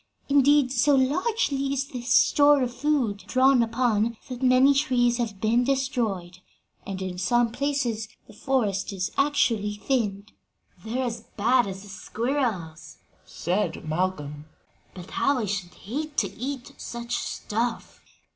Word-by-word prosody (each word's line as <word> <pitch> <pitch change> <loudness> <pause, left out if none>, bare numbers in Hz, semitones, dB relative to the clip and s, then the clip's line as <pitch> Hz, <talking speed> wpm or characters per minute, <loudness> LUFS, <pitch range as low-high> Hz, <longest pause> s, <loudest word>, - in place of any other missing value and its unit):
Indeed, 285 -1 +4
so 275 +3 +3
largely 275 - +1
is 275 0 -2
this 245 -1 -6
store 285 +1 +5
of 245 -1 -3
food 265 -8 0
drawn 260 0 +4
upon 230 -1 +1
that 250 0 -6
many 260 +2 +5
trees 250 -4 +2
have 220 -5 -3
been 230 +4 +2
destroyed, 240 -10 -1 0.5
and 195 -1 -4
in 180 -1 -5
some 240 +5 +2
places 250 -4 -1 0.2
the 220 - -16
forest 210 -5 -1
is 185 -2 -3
actually 230 -8 +1
thinned." 205 -2 -2 0.5
"They're 240 +4 -2
as 230 -1 -5
bad 240 +2 +3
as 190 0 -7
the 205 - -13
squirrels," 215 - -3 0.3
said 175 -2 -2
Malcolm. 155 -3 -2 0.5
"But 180 -1 -10
how 280 -1 +1
I 230 - -1
should 185 -3 -4
hate 295 +7 -6
to - - 0
eat 260 0 -5
such 235 0 -4
stuff!" 230 +2 -3
240 Hz, 135 wpm, -25 LUFS, 205-270 Hz, 0.5 s, store